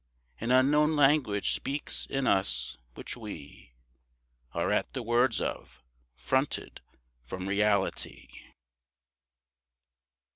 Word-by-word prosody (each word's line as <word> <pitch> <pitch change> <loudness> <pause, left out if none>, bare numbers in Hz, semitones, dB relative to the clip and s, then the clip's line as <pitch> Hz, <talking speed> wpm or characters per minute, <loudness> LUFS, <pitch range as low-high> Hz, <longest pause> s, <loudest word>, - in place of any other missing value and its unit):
An 115 - -3
unknown 150 +5 +4
language 135 -8 +3
speaks 140 +2 -2
in 135 -1 -1
us, 95 - +1 0.2
which - - -6
we 80 - -10 0.8
Are - - -1
at - - 0
the 130 - -4
words 120 0 +2
of, 65 - -5 0.3
fronted 130 - -1 0.4
from 90 +10 -6
reality. 100 0 0
120 Hz, 95 wpm, -29 LUFS, 100-135 Hz, 0.8 s, unknown